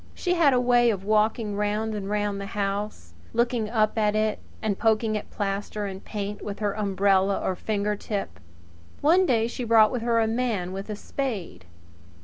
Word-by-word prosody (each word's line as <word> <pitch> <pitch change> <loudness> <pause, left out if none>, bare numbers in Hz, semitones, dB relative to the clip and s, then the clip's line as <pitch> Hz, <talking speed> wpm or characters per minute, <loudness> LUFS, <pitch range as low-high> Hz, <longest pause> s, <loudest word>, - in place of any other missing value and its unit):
She 360 - 0
had 330 -5 +4
a 250 - +3
way 245 -1 +4
of 200 -4 -1
walking 215 0 +1
round 210 +2 -1
and 200 -2 -4
round 205 -1 -1
the 200 - -5
house, 200 - -3 0.2
looking 235 -2 +1
up 220 -1 +1
at 210 -1 +2
it 215 0 +1
pridefully - - -25
and 210 -3 -1
poking 220 -1 +2
at 210 - -4
plaster 205 +1 -3
and 190 -1 -6
paint 205 -1 -5
with 200 -1 -5
her 205 -2 -1
umbrella 195 -1 +2
or 185 - -1
fingertip. 205 - -3 0.6
One 355 +5 +4
day 225 -3 +3
she 240 +2 -4
brought 225 -2 +5
with 250 - -2
her 230 0 +2
a 225 - +3
man 220 -6 -1
with 195 +2 -6
a 210 - -3
spade. 210 - -4
210 Hz, 185 wpm, -26 LUFS, 200-230 Hz, 0.6 s, brought